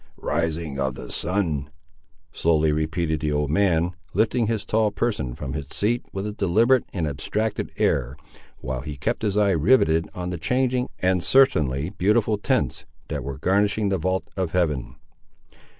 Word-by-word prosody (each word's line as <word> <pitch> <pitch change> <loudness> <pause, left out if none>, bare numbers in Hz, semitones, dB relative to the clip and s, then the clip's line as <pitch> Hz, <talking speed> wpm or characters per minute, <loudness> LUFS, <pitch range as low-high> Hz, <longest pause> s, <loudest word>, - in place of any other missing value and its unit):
"Rising 80 -3 -2
of 65 -2 -1
the - - -8
sun!" 80 -7 -1 0.6
slowly 80 -2 +2
repeated 80 +1 -1
the 75 -1 -1
old 75 -1 0
man, 85 -1 +2 0.2
lifting 110 +2 +2
his 110 -2 -1
tall 110 -1 +2
person 100 - -2
from 65 0 -5
its 75 -2 -6
seat 120 +4 0
with 95 +1 -4
a 105 - -2
deliberate 110 +6 +3
and 85 -5 -2
abstracted 105 +9 -2
air, - - +1 0.5
while 65 0 -3
he 75 0 -7
kept 115 - -2
his 105 -2 0
eye 105 -1 +4
riveted 80 - +3
on 90 0 -4
the 90 - -4
changing, 125 +7 +1
and 90 -1 +1
certainly 80 - +3
beautiful 105 +2 +1
tints, 115 - 0 0.3
that - - -3
were 70 0 -5
garnishing 100 +5 +1
the 95 -2 0
vault 95 +3 -1
of 95 -4 -2
Heaven. 80 -8 0
90 Hz, 160 wpm, -24 LUFS, 75-105 Hz, 0.6 s, eye